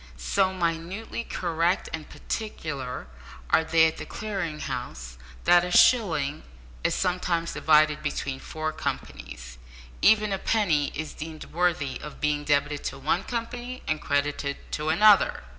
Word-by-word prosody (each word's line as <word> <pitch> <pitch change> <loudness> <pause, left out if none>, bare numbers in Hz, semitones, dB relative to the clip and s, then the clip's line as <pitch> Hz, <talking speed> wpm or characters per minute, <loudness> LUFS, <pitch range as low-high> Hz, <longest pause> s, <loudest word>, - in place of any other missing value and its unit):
So 190 - +1
minutely 180 +6 -3
correct 170 -2 0
and 160 -1 -6
particular 140 - -5 0.5
are 160 - +5
they 160 0 +4
at 160 - 0
the - - -6
Clearing 190 -8 -4
House, 65 - -5 0.3
that 175 0 +6
a 180 - -3
shilling 165 - +4 0.4
is - - +1
sometimes 175 -2 0
divided 155 -1 +4
between 140 -3 -3
four 155 +3 -4
companies. - - -6 0.4
Even 215 -1 +5
a 195 - -2
penny 170 -12 +1
is 155 0 -4
deemed 155 0 -7
worthy 165 -5 0
of 150 - -9
being 150 -1 0
debited 145 0 +1
to - - -3
one 155 +7 0
company 245 +1 -5
and 155 -1 -1
credited 145 0 -1
to 150 +1 -2
another! 205 +6 +5
160 Hz, 140 wpm, -26 LUFS, 145-185 Hz, 0.5 s, that